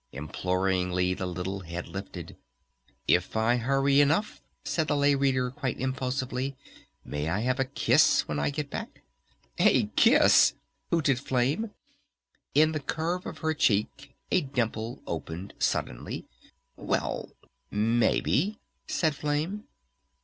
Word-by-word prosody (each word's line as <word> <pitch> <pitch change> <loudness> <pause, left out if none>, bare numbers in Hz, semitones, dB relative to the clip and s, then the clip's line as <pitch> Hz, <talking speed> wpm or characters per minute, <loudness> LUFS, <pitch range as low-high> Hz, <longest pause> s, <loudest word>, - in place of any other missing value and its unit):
Imploringly 90 +3 0
the 95 0 -4
little 90 +2 -4
head 85 -1 -6
lifted. 90 -2 -7 0.7
"If - - +2
I 115 +2 +3
hurry 135 +3 +3
enough," 160 +9 +1 0.2
said 160 -2 -1
the 145 - +1
Lay 145 0 +4
Reader 130 -2 +1
quite 135 -2 -3
impulsively, 130 +1 -2 0.5
"may 75 +2 -3
I 95 +5 0
have 130 +3 0
a 135 - +2
kiss 135 - +3
when 75 - -2
I - - +1
get 145 0 -4
back?" - - -7 0.6
"A - - +5
kiss?" - - +6 0.3
hooted 140 -6 +2
Flame. 135 - 0 0.9
In 155 +2 +5
the 155 - -2
curve 165 +5 -2
of - - -7
her 160 - +2
cheek 135 +1 0 0.2
a 185 - +4
dimple 120 -3 -3
opened 85 +3 -5
suddenly. - - -2 0.5
"Well... - - -2 0.4
maybe," 120 - +1 0.3
said 160 -3 +1
Flame. 150 +9 -2
130 Hz, 125 wpm, -28 LUFS, 95-145 Hz, 0.9 s, kiss